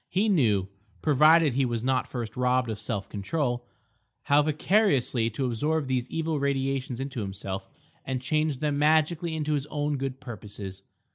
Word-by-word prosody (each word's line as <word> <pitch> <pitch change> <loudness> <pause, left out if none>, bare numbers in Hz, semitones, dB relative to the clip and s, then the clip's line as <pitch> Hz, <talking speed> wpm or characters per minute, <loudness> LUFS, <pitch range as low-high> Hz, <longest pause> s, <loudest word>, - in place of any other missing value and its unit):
He 205 +4 +1
knew—provided 135 - +3
he 135 +2 +2
was 120 -2 -1
not 130 0 +1
first 115 -4 -5
robbed 125 -1 +1
of 105 - -5
self 100 -5 -3
control—how 120 +3 -2
vicariously 150 - +2
to 125 +4 -3
absorb 150 +6 0
these 130 -1 -1
evil 160 -2 -1
radiations 135 -2 -1
into 135 -3 -4
himself 95 -1 -5 0.3
and 130 -1 -2
change 155 +1 0
them 145 -2 0
magically 160 +2 +2
into 155 -1 -1
his 145 -1 -1
own 145 -1 -1
good 135 -1 -4
purposes. 100 -6 -8
130 Hz, 145 wpm, -27 LUFS, 115-150 Hz, 0.3 s, knew—provided